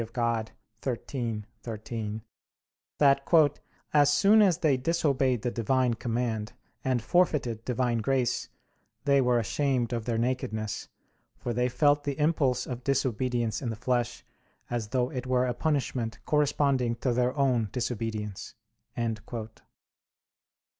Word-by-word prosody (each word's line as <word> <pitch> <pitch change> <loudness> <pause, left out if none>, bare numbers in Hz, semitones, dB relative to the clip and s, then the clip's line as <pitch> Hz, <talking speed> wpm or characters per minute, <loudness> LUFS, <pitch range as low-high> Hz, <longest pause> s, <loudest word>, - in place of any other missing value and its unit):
Dei 115 0 -1 0.4
xiii, 120 -3 -3 0.2
13) 110 -1 -5 0.7
that, 145 +1 +4 0.3
"as 145 -1 +5
soon 205 +8 +5
as 185 -6 +4
they 155 -6 +3
disobeyed 135 -4 +1
the 120 - 0
Divine 125 +2 +1
command, 115 -2 -2 0.3
and 130 -4 0
forfeited 140 -11 +1
Divine 125 -2 0
grace, 125 +1 0 0.6
they 140 -1 +4
were 125 -1 +3
ashamed 125 +1 0
of 115 -2 -2
their 115 -2 0
nakedness, 110 -3 -2 0.5
for 120 - -3
they 125 +2 +1
felt 145 +2 +3
the 140 -2 -3
impulse 145 -5 +2
of 125 -1 -6
disobedience 125 -3 0
in 125 - -2
the 115 - -3
flesh, 120 +1 -1 0.5
as 120 -3 -2
though 125 +2 0
it 130 -3 -4
were 125 0 +2
a 125 - 0
punishment 125 -7 -1
corresponding 140 -5 +2
to 120 +1 -1
their 125 +3 +1
own 125 -6 +2
disobedience." 110 -4 -4
125 Hz, 125 wpm, -28 LUFS, 115-140 Hz, 0.7 s, as